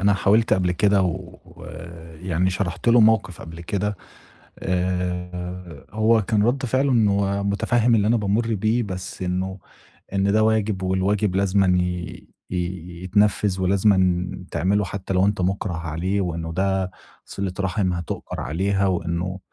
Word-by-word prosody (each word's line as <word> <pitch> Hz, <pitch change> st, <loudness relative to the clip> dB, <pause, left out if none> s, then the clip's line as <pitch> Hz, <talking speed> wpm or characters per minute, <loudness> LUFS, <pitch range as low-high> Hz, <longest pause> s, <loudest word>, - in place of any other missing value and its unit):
أنا 100 Hz, +1 st, +4 dB
حاولت 105 Hz, +3 st, +3 dB
قبل 90 Hz, -1 st, +2 dB
كده 100 Hz, +1 st, +3 dB
ويعني 85 Hz, -1 st, -4 dB
شرَحت 90 Hz, +2 st, -2 dB
له 120 Hz, 0 st, +6 dB
موقِف 110 Hz, -6 st, +3 dB
قبل 80 Hz, +1 st, -9 dB
كده 100 Hz, +3 st, -2 dB, 0.6 s
آآ، 90 Hz, -2 st, -3 dB
هو 110 Hz, +1 st, +3 dB
كان 105 Hz, 0 st, +1 dB
رَد 130 Hz, +5 st, +1 dB
فِعله 130 Hz, +3 st, +1 dB
إنّه 100 Hz, -3 st, +2 dB
متفهِّم 115 Hz, +4 st, +2 dB
اللي 105 Hz, -2 st, +3 dB
أنا 115 Hz, +2 st, +3 dB
بامُرّ 110 Hz, +2 st, 0 dB
بيه 110 Hz, +4 st, +1 dB
بس 95 Hz, -3 st, -6 dB
إنه، 95 Hz, +1 st, -2 dB, 0.6 s
إن 100 Hz, 0 st, +2 dB
"ده 110 Hz, +1 st, +3 dB
واجب 110 Hz, -3 st, +1 dB
والواجب 95 Hz, +1 st, +1 dB
لازمًا 95 Hz, -1 st, +3 dB
ي 90 Hz, -1 st, -4 dB, 0.2 s
ي -, -, -2 dB, 0.5 s
يتنفّذ 100 Hz, 0 st, +2 dB
ولازمًا 95 Hz, -2 st, +3 dB, 0.2 s
تعمله 100 Hz, +2 st, +1 dB
حتى 95 Hz, 0 st, -5 dB
لو 95 Hz, +1 st, +3 dB
أنت 100 Hz, -1 st, 0 dB
مُكرَه 95 Hz, 0 st, -1 dB
عليه، 85 Hz, +4 st, -2 dB
وإنه 85 Hz, -2 st, -3 dB
ده 95 Hz, +1 st, 0 dB, 0.3 s
صِلة 95 Hz, -2 st, -4 dB
رَحم 95 Hz, -1 st, 0 dB
هتؤجر 85 Hz, -1 st, -5 dB
عليها 95 Hz, +4 st, 0 dB
وإنه" 90 Hz, +1 st, -2 dB
95 Hz, 140 wpm, -23 LUFS, 90-105 Hz, 0.6 s, له